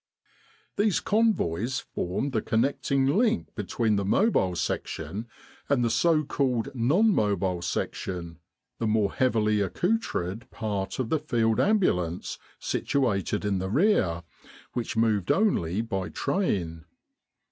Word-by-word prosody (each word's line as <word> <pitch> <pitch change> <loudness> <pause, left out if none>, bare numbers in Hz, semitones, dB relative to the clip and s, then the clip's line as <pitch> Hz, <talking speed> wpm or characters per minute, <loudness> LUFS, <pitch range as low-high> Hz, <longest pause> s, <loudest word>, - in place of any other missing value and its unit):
These 205 -1 +2
Convoys 130 - +1
formed 110 +4 -3
the 110 -4 0
connecting 135 +4 +1
link 215 - +1
be 105 - -4
tween 110 0 +1
the 100 - 0
Mobile 100 - +2
Section 105 +5 -3 0.4
and 130 -4 +3
the 115 - +1
so 155 +7 +3
called 135 -3 -1
Non 160 - +3
Mobile 95 - 0
Section 85 -2 -4 0.4
the 115 - 0
more 105 -2 +1
heavily 110 -5 +2
accoutred 115 - -1
part 100 -4 -3
of 130 -4 -2
the 160 - +1
Field 115 -7 +1
Ambulance 90 - +1 0.2
situated 105 -7 -1
in 100 -2 0
the 95 +1 -3
rear 105 - +2 0.5
which 120 -2 -3
moved 110 -5 +2
only 110 - +1
by 95 -5 -3
train. 85 - -1
115 Hz, 125 wpm, -27 LUFS, 95-140 Hz, 0.5 s, and